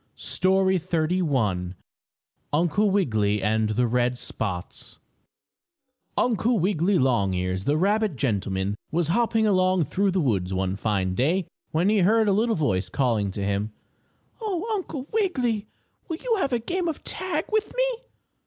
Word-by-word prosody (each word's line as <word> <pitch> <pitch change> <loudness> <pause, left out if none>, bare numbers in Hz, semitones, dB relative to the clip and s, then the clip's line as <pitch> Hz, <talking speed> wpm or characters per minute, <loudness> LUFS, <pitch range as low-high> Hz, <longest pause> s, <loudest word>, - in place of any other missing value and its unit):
STORY 190 0 +2
XXXI 150 - 0 0.8
UNCLE 175 +7 +2
WIGGILY 110 - +1
AND 110 +1 +1
THE 120 +3 +1
RED 125 +1 +1
SPOTS 95 -6 -5 1.2
Uncle 235 0 +2
Wiggily 185 0 +2
Longears, 95 -7 0
the 145 +2 +2
rabbit 205 0 +1
gentleman, 100 -6 -1 0.2
was 165 -1 0
hopping 225 +3 +2
along 185 -3 +3
through 195 +6 0
the 190 0 0
woods 95 - 0
one 95 0 -1
fine 95 -3 -1
day 165 - +1 0.2
when 165 +4 +1
he 215 -1 +3
heard 215 +4 +4
a - - +4
little 225 +3 +2
voice 95 - 0
calling 115 -4 0
to 100 +1 -4
him: 100 +2 -1 0.7
"Oh, 405 -4 -2
Uncle 320 -10 -4
Wiggily! 255 - 0 0.4
Will 325 - -3
you 470 +4 0
have 320 -8 0
a 245 - +2
game 345 +10 -2
of 320 - -4
tag - - -2
with 435 -1 0
me?" - - +1
165 Hz, 145 wpm, -25 LUFS, -, 1.2 s, heard